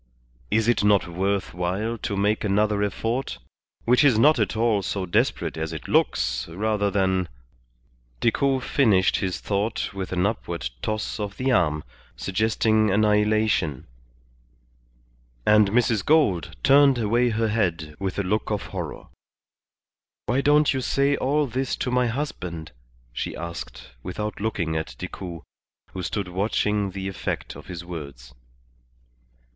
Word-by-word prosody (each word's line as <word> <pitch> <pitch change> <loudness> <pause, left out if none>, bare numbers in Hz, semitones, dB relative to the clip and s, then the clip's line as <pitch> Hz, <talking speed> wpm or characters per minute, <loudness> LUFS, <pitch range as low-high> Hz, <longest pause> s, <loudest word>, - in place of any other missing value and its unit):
Is 110 - +2
it 120 -3 +2
not 105 -2 +4
worth 95 +3 -1
while 95 +6 -2
to 100 - -3
make 105 +2 +1
another 105 0 +1
effort, 115 +6 -2 0.5
which 125 +4 +4
is 135 -6 +5
not 145 +4 +5
at 110 +1 0
all 110 -3 +2
so 95 +1 -2
desperate 85 - 0
as 80 0 -3
it 80 - -7
looks, - - +1
rather 105 +4 0
than 95 -2 +1 0.4
" - - -38
Decoud 130 +2 +1
finished 105 -10 +3
his 95 -2 -2
thought 105 +1 -2
with 95 -1 -5
an 90 0 +1
upward 85 - -3
toss 110 0 -3
of 100 -1 -4
the 130 +1 0
arm, 75 - +2 0.3
suggesting 110 +2 +1
annihilation; 105 -6 +2 1.6
and 105 -1 +5
Mrs. 115 -2 +2
Gould 95 - +2
turned 140 -1 +6
away 120 +2 +2
her 110 0 0
head 85 -8 -1
with 95 -1 -3
a 100 - 0
look 105 +4 -1
of 105 -4 -1
horror. - - -5 1.2
"Why 130 +3 +1
don't 150 +1 +4
you 130 - -1
say 140 +2 +2
all 145 +3 +1
this 130 0 -2
to 125 - -3
my 125 0 +2
husband?" 90 - -4 0.4
she - - -4
asked, 85 -1 -7
without 105 - -5
looking 85 -7 -1
at 80 0 -3
Decoud, 90 -2 -7 0.5
who 95 - -4
stood 95 +2 -3
watching 100 +2 0
the 95 0 -5
effect 95 - -4
of - - -12
his 85 -1 -7
words. 70 -8 -8
105 Hz, 140 wpm, -24 LUFS, 90-115 Hz, 1.6 s, turned